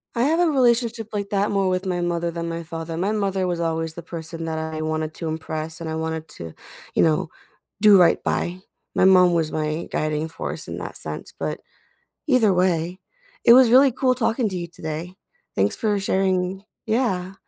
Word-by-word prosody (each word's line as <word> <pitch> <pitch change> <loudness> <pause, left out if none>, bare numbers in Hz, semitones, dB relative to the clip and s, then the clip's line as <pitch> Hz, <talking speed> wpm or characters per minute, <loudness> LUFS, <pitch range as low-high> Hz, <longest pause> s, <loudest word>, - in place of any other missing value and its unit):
I 235 - +2
have 320 +5 +2
a 350 - +4
relationship 235 -4 +2
like 200 -1 -3
that 200 -1 +1
more 195 -2 +1
with 185 +1 -1
my 180 -1 -1
mother 170 -1 -1
than 170 0 -4
my 165 0 -4
father. 165 0 -6
My 195 +5 0
mother 195 -3 0
was 175 -1 -2
always 165 -1 -1
the 170 - -8
person 165 -1 -7
that 160 -1 -3
I 160 0 -4
wanted 155 0 -2
to 165 -2 -4
impress 160 0 -4
and 165 -1 -5
I 160 - -3
wanted 160 0 -3
to, 80 -1 -7 0.4
you - - +4
know, 160 0 +1 0.5
do 210 -2 +8
right 175 -2 +4
by. 175 +1 -1 0.4
My - - +3
mom 180 -2 +6
was 165 -2 0
my 155 +1 -2
guiding 155 0 -1
force 160 - -6
in - - -5
that - - -6
sense, - - -6
but - - -3 0.7
either 250 -8 +4
way, 180 -1 +1 0.5
it 235 - +8
was 250 -1 +7
really 265 +1 +6
cool 255 0 +2
talking 230 -1 0
to 185 - -5
you 170 - -4
today, 165 +1 -6 0.4
thanks - - +1
for 215 -4 0
sharing 190 0 0 0.2
Yeah, 195 -5 0
180 Hz, 195 wpm, -23 LUFS, 160-205 Hz, 0.7 s, do